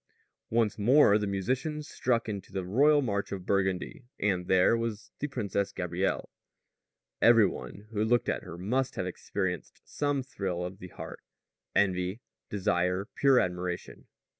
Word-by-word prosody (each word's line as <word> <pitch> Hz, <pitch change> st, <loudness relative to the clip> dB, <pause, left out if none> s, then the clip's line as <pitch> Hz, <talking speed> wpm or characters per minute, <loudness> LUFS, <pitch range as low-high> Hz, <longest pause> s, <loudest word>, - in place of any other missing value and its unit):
Once 110 Hz, -2 st, +1 dB
more 110 Hz, -1 st, +6 dB
the 105 Hz, -, -1 dB
musicians 130 Hz, -, -2 dB
struck 120 Hz, -2 st, 0 dB
into 100 Hz, -3 st, -5 dB
the 95 Hz, -2 st, -3 dB
royal 145 Hz, +9 st, +4 dB
march 100 Hz, -4 st, -2 dB
of 95 Hz, -2 st, -5 dB
Burgundy, 95 Hz, -2 st, 0 dB, 0.2 s
and 90 Hz, -3 st, 0 dB
there 95 Hz, +4 st, +5 dB
was 115 Hz, -2 st, -4 dB
the 145 Hz, -, -1 dB
Princess 100 Hz, -7 st, -2 dB
Gabrielle. 90 Hz, +2 st, -2 dB, 0.9 s
Every 115 Hz, -2 st, +7 dB
one 90 Hz, +4 st, -5 dB
who 105 Hz, -1 st, 0 dB
looked 120 Hz, +2 st, +2 dB
at -, -, 0 dB
her 85 Hz, -, -9 dB
must 125 Hz, +9 st, -1 dB
have 95 Hz, -, -2 dB
experienced 90 Hz, -1 st, -3 dB
some 145 Hz, -2 st, -1 dB
thrill 95 Hz, -9 st, -3 dB
of 95 Hz, +2 st, -7 dB
the 90 Hz, -, -8 dB
heart -, -, -9 dB, 0.5 s
envy, 95 Hz, +1 st, +1 dB, 0.3 s
desire, 90 Hz, -1 st, 0 dB
pure 135 Hz, -2 st, +5 dB
admiration. 90 Hz, -1 st, -3 dB
100 Hz, 145 wpm, -29 LUFS, 90-120 Hz, 0.9 s, Every